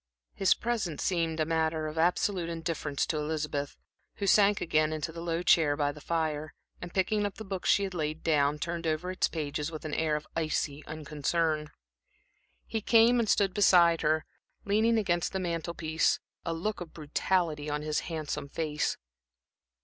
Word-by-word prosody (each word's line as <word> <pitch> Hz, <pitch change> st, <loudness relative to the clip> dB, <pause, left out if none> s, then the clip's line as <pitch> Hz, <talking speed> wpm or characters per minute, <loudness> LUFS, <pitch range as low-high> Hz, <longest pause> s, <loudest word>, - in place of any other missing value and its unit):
His 195 Hz, -, +3 dB
presence 220 Hz, -10 st, -2 dB
seemed 165 Hz, -3 st, 0 dB
a 155 Hz, -, +2 dB
matter 160 Hz, -1 st, 0 dB
of 155 Hz, 0 st, -5 dB
absolute 175 Hz, +1 st, +1 dB
indifference 165 Hz, -4 st, -2 dB
to 155 Hz, -, -2 dB
Elizabeth, 150 Hz, -2 st, -3 dB, 0.4 s
who 200 Hz, -, -3 dB
sank 205 Hz, 0 st, +5 dB
again 155 Hz, -1 st, +1 dB
into 155 Hz, +1 st, -3 dB
the 165 Hz, +1 st, -8 dB
low 170 Hz, 0 st, -2 dB
chair 150 Hz, -5 st, +4 dB
by 145 Hz, -1 st, +1 dB
the 150 Hz, +1 st, -12 dB
fire, 155 Hz, -2 st, -2 dB, 0.3 s
and 175 Hz, -, -7 dB
picking 205 Hz, +3 st, +1 dB
up 205 Hz, -1 st, -2 dB
the 220 Hz, -, -8 dB
book 190 Hz, -2 st, -4 dB
she 200 Hz, -, +4 dB
had 190 Hz, -1 st, -3 dB
laid 155 Hz, -2 st, -3 dB
down, 150 Hz, -2 st, +2 dB
turned 170 Hz, 0 st, -3 dB
over 160 Hz, +4 st, -1 dB
its 185 Hz, -, +1 dB
pages 150 Hz, -1 st, -3 dB
with 155 Hz, -1 st, -7 dB
an 155 Hz, -, -4 dB
air 160 Hz, -2 st, +1 dB
of 150 Hz, 0 st, -4 dB
icy 155 Hz, -2 st, -1 dB
unconcern. 155 Hz, +1 st, -1 dB, 1.0 s
He 220 Hz, -, -3 dB
came 230 Hz, +3 st, +5 dB
and 225 Hz, -3 st, 0 dB
stood 195 Hz, -3 st, +3 dB
beside 175 Hz, -4 st, +5 dB
her, 155 Hz, 0 st, +1 dB, 0.4 s
leaning 220 Hz, +3 st, +3 dB
against 175 Hz, -5 st, 0 dB
the 190 Hz, -, -1 dB
mantel 170 Hz, -1 st, -3 dB
piece, 160 Hz, 0 st, +1 dB, 0.2 s
a 165 Hz, -, -2 dB
look 205 Hz, +4 st, -3 dB
of 170 Hz, -2 st, -8 dB
brutality 155 Hz, 0 st, -1 dB
on 150 Hz, 0 st, -2 dB
his 155 Hz, 0 st, 0 dB
handsome 150 Hz, -3 st, -4 dB
face. 150 Hz, -1 st, -1 dB
165 Hz, 175 wpm, -29 LUFS, 155-180 Hz, 1.0 s, sank